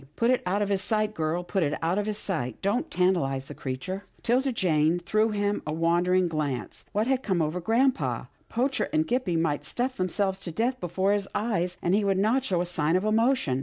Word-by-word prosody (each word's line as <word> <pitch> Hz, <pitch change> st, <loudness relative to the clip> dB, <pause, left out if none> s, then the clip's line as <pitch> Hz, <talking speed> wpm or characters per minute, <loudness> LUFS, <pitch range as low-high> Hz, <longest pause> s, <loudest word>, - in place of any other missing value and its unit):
" -, -, -39 dB
Put 235 Hz, +2 st, +2 dB
it 255 Hz, -, +2 dB
out 200 Hz, +3 st, +1 dB
of 205 Hz, -, -2 dB
his 195 Hz, -1 st, +1 dB
sight, 215 Hz, +1 st, 0 dB
girl, 165 Hz, 0 st, -1 dB
put 190 Hz, +2 st, -1 dB
it 150 Hz, -2 st, 0 dB
out 170 Hz, +5 st, 0 dB
of 210 Hz, -, -2 dB
his 210 Hz, -1 st, -1 dB
sight. 140 Hz, -, -3 dB
Don't 205 Hz, +6 st, 0 dB
tantalize 165 Hz, -7 st, +1 dB
the -, -, -7 dB
creature." 180 Hz, +10 st, -5 dB, 0.2 s
'Tilda 260 Hz, +3 st, +2 dB
Jane 165 Hz, -6 st, +2 dB
threw 215 Hz, +6 st, +1 dB
him 205 Hz, -1 st, 0 dB
a -, -, -1 dB
wondering 175 Hz, +3 st, +2 dB
glance. 145 Hz, -, -3 dB
What 210 Hz, +2 st, +1 dB
had 260 Hz, 0 st, +1 dB
come 190 Hz, -7 st, 0 dB
over 160 Hz, +3 st, -1 dB
grampa? 200 Hz, -, +1 dB, 0.2 s
Poacher 260 Hz, +4 st, 0 dB
and 310 Hz, +1 st, +2 dB
Gippie 245 Hz, -, 0 dB
might 150 Hz, -3 st, 0 dB
stuff 255 Hz, +2 st, -2 dB
themselves 190 Hz, +1 st, 0 dB
to 175 Hz, -, -5 dB
death 240 Hz, +8 st, -1 dB
before 185 Hz, +3 st, 0 dB
his 200 Hz, -1 st, -1 dB
eyes, 180 Hz, -5 st, -1 dB
and 175 Hz, -, +2 dB
he 205 Hz, +1 st, +3 dB
would 195 Hz, -1 st, +2 dB
not 225 Hz, +7 st, +2 dB
show 185 Hz, -9 st, 0 dB
a -, -, -1 dB
sign 165 Hz, -2 st, +1 dB
of 185 Hz, +3 st, +1 dB
emotion. 220 Hz, -, +2 dB
190 Hz, 220 wpm, -27 LUFS, 165-215 Hz, 0.2 s, he